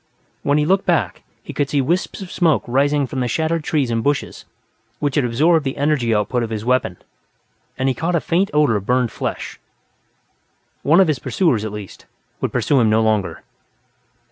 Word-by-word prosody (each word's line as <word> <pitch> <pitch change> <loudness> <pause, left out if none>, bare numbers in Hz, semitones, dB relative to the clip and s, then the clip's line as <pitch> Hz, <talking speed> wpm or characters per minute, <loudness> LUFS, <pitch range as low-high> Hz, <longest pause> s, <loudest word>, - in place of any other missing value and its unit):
When 145 +1 +1
he 150 - +2
looked 190 +4 +1
back, 155 - 0 0.2
he - - -8
could 145 -1 -1
see 145 - +1
wisps 170 +9 -1
of 180 - -10
smoke 165 -5 +2
rising 140 +3 +1
from 130 +1 -5
the 125 - 0
shattered 160 +5 -1
trees 145 -6 0
and 115 -1 -1
bushes 145 -1 -2 0.5
which 145 -2 -1
had 145 - +2
absorbed 150 +7 +2
the 135 -1 -3
energy 145 -5 +1
output 110 +3 0
of 115 - -3
his 110 -1 -4
weapon, 125 +1 +1 0.8
and 130 +1 0
he 135 - +2
caught 165 +6 -1
a - - +3
faint 180 +5 0
odor 150 -6 +3
of 100 - -7
burned 125 -2 +1
flesh. - - -5 1.2
One 160 +5 +4
of 190 - +5
his 150 -5 0
pursuers, 135 - 0
at 110 - -4
least, 105 -3 -9 0.3
would - - -2
pursue 140 - +2
him 115 -3 +3
no 110 +1 +3
longer. 110 -3 -1
140 Hz, 195 wpm, -20 LUFS, 115-155 Hz, 1.2 s, of